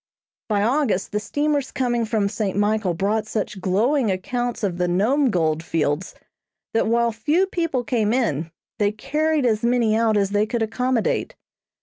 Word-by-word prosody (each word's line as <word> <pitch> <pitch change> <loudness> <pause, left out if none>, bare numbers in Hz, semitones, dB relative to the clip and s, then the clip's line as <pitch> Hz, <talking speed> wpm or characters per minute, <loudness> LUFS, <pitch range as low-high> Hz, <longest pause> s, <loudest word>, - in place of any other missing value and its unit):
By 205 -1 +2
August 235 -5 +1
the 210 - 0
steamers 290 +5 -1
coming 240 -3 0
from 215 -2 0
St. 200 -2 -2
Michael 205 -3 +1
brought 210 +4 0
such 210 -3 -3
glowing 225 +7 +2
accounts 240 +6 -2
of 180 -3 -1
the 180 - +1
Nome 240 +11 +2
gold 160 -5 +1
fields, 160 0 -1 0.6
that 225 - +2
while 235 +1 +2
few 300 - +1
people 330 -9 -1
came 230 -6 0
in, 170 - 0 0.3
they 205 -1 +2
carried 300 +6 0
as 220 -3 +2
many 235 -2 +2
out 225 -1 +2
as 200 -1 +1
they 205 +1 +2
could 230 0 -1
accommodate. 240 +1 -1
220 Hz, 160 wpm, -22 LUFS, 200-250 Hz, 0.6 s, By